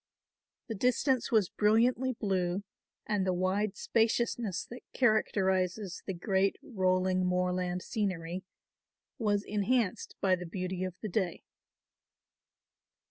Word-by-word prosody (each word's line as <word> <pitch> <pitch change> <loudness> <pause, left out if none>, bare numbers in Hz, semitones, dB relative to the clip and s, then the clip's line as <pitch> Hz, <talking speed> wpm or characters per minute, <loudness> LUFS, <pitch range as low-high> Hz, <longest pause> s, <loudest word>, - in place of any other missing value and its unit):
The 225 - -4
distance 250 +4 +1
was 215 -6 +3
brilliantly 240 +5 +3
blue 190 -3 -1 0.4
and 210 -3 0
the 185 -1 +1
wide 190 +3 0
spaciousness 225 -3 0
that 245 +1 -10
characterises 190 -5 +1
the 190 - -2
great 190 +2 +1
rolling 185 -5 +1
moorland 180 0 0
scenery 185 -4 -2 0.8
was 205 -3 +1
enhanced 210 0 0
by 190 -1 +3
the 180 -1 -7
beauty 185 0 -3
of 185 -1 -4
the 215 - -3
day. 185 -3 -1
195 Hz, 110 wpm, -31 LUFS, 185-220 Hz, 0.8 s, was